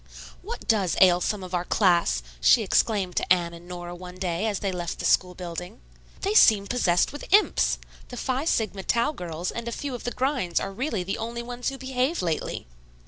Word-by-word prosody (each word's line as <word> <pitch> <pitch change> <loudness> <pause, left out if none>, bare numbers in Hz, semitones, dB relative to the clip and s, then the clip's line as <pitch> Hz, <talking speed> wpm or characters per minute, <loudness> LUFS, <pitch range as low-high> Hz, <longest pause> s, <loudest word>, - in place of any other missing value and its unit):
"What - - -7
does 200 -6 +2
ail 180 -1 +6
some 200 +1 -1
of 185 0 -9
our 175 -1 0
class?" 175 - +2 0.2
she 230 - +5
exclaimed 195 -2 +1
to - - -1
Anne 175 -2 +3
and 170 +1 -12
Nora 175 -1 -7
one 180 0 -9
day 185 +2 -1
as 205 -2 -1
they 195 0 -2
left 175 -2 -4
the - - -5
school 180 -1 +2
building. 180 +4 -7 0.4
"They 400 +2 0
seem 210 - +6
possessed 195 -3 +1
with 290 - -9
imps. 415 +2 +4 0.3
The 245 - -9
Phi 260 +4 -1
Sigma 215 - 0
Tau 235 +7 +1
girls 175 - -5
and 235 0 -6
a - - -2
few 280 +3 -4
of 245 - -6
the - - -1
grinds 255 - 0
are 195 - -4
really 225 -4 -2
the 195 +4 -3
only 235 +1 -4
ones 245 +1 -3
who 270 - -7
behave 265 - -1
lately." 165 -3 -2
195 Hz, 205 wpm, -26 LUFS, 180-245 Hz, 0.4 s, ail